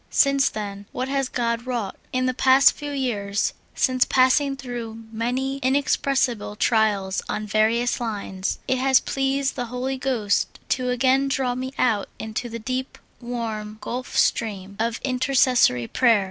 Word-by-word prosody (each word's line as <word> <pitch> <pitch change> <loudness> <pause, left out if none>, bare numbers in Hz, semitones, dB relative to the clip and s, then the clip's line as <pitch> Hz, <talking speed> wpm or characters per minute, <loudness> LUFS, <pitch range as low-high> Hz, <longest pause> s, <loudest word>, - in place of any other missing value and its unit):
Since 275 -1 +3
then, 200 -1 -6
what 255 +1 -3
has 275 -2 0
God 235 0 -2
wrought! 235 -6 -2 0.2
In 255 0 0
the 255 - +1
past 265 +2 +6
few 290 -1 -7
j^ears, 215 -8 -1 0.2
since 255 -2 +3
passing 270 +2 +3
through 235 -4 -6
many 250 +4 -2
in 265 0 +1
expressible 265 -6 0
trials 205 -4 +1
on 210 0 -2
various 220 +4 +1
lines, 200 -4 -3
it 260 - +1
has 265 0 +5
pleased 270 0 -1
the 245 - -2
Holy 255 +2 -3
Ghost 235 -6 0
to 255 -1 0
again 260 +2 +2
draw 265 -2 0
me 260 +1 -4
out 220 -5 +1
into 220 +2 -4
the 230 - -5
deep, 255 +3 -4 0.2
warm 225 -3 -5
gulf 250 +3 -5
stream 200 -3 0
of 225 0 -1
intercessory 255 - +3
prayer. 230 - +3
245 Hz, 150 wpm, -23 LUFS, 220-260 Hz, 0.2 s, past